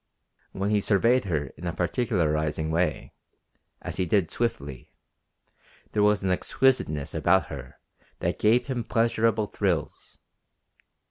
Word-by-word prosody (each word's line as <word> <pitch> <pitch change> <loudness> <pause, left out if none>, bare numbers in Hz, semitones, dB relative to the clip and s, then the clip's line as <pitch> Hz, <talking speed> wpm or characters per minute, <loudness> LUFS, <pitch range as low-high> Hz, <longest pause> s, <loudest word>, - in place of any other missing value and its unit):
When 100 +2 -2
he 105 - +3
surveyed 115 +4 +2
her 75 -7 -2
in 90 - -6
a 85 - -2
particularizing 80 -6 0
way, 85 -1 -1 0.7
as - - -5
he 90 - 0
did 90 -2 +1
swiftly, 70 - -4 1.0
there 105 - +1
was 105 -1 +3
an 95 - +1
exquisiteness 90 - +1
about 85 -3 +2
her 65 -2 -9 0.4
that - - -2
gave 115 +3 +3
him 130 -4 -3
pleasureable 115 -2 +1
thrills. 90 -7 -2
95 Hz, 125 wpm, -26 LUFS, 80-110 Hz, 1.0 s, he